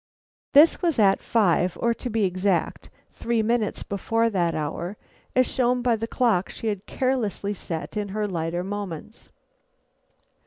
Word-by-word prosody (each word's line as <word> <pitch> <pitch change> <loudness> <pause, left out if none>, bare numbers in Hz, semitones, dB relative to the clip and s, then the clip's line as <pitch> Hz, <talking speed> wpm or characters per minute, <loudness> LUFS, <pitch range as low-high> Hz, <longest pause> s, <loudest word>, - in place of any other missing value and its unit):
This 300 +3 +6
was 340 -4 +1
at 195 -3 +4
five, 185 -5 +2
or, 235 0 +2
to 245 - -6
be 225 -1 0
exact, 185 0 -1 0.2
three 230 -1 -1
minutes 230 -1 0
before 225 +3 0
that 175 -4 0
hour, 165 +6 -4 0.4
as 255 0 +5
shown 250 -1 0
by 240 -2 +3
the 225 +1 -4
clock 230 -7 +1
she - - -8
had 205 -2 -4
carelessly 235 -6 -1
set 165 -2 -5
in 205 -1 -2
her 210 +2 -2
lighter 170 -1 -2
moments. 200 0 -6
210 Hz, 150 wpm, -25 LUFS, 185-235 Hz, 0.4 s, This